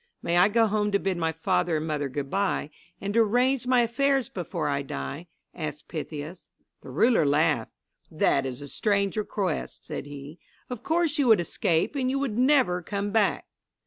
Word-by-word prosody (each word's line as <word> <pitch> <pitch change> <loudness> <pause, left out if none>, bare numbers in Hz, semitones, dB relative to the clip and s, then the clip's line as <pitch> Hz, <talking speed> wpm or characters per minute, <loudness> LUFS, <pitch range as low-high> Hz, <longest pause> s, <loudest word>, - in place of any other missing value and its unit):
"May 170 +1 +1
I 180 +2 +6
go 225 +2 +3
home 210 -1 0
to - - +5
bid 190 -2 -1
my 165 -1 0
father 175 0 0
and 155 - -3
mother 150 -3 -2
good 140 +1 -4
bye, 195 -6 0 0.3
and 200 +1 -3
to 230 - +3
arrange 245 +4 +2
my 250 -1 +4
affairs 265 +2 +1
before 170 -3 -3
I 140 -1 0
die?" 135 - -6 0.3
asked 150 -3 -6
Pythias. 155 +1 -6 0.3
The - - -11
ruler 230 -7 +3
laughed. 145 -4 +1 0.4
"That 135 - +2
is 130 +2 -6
a - - -8
strange 200 +4 0
request," 200 -5 -3
said 140 - -6
he. 145 +3 -9 0.3
"Of 250 - -5
course 330 -3 0
you 275 - +3
would 220 -5 +6
escape 170 - 0
and 260 -2 0
you 270 - 0
would 275 -6 -2
never 250 -8 +3
come 200 +3 -3
back." 215 -2 +1
190 Hz, 185 wpm, -26 LUFS, 155-230 Hz, 0.4 s, I